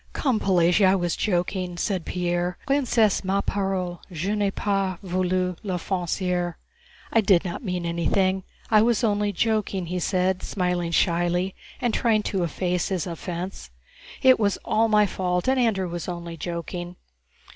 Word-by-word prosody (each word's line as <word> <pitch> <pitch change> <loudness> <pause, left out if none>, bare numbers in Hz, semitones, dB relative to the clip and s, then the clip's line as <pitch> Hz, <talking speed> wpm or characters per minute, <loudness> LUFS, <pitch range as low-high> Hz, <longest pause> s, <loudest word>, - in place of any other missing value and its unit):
"Come, 255 -7 +1
Pelagéya, 180 0 +4
I 190 - +5
was 175 -3 0
joking," 180 -2 -1
said 185 -1 -1
Pierre. 175 0 -1
"Princesse, 245 -8 +2
ma 195 +1 +1
parole, 190 -4 -2
je 180 +5 -2
n'ai 205 -1 +1
pas 195 -2 -1
voulu 185 0 0
l'offenser. 180 -2 -1 0.3
* - - -25
I 225 - +5
did 190 -3 +4
not 175 +8 -4
mean 180 -4 -2
anything, 185 +3 +1 0.3
I 215 -1 +7
was 235 +1 +2
only 205 -2 +1
joking," 205 -2 0
he 180 +2 -3
said, 185 +1 +1
smiling 180 -2 -1
shyly 175 +2 +1 0.3
and 240 -2 0
trying 220 -4 +2
to 195 -2 -1
efface 175 +1 -1
his 185 -5 -1
offense. 175 +2 -5 0.5
"It 260 -2 +7
was 200 -2 +1
all 225 +1 +3
my 210 -1 +4
fault, 180 -1 -1
and 265 0 +3
Andrew 210 -6 +1
was 175 0 -5
only 170 -1 -5
joking." 175 +2 -5
185 Hz, 155 wpm, -25 LUFS, 175-205 Hz, 0.5 s, I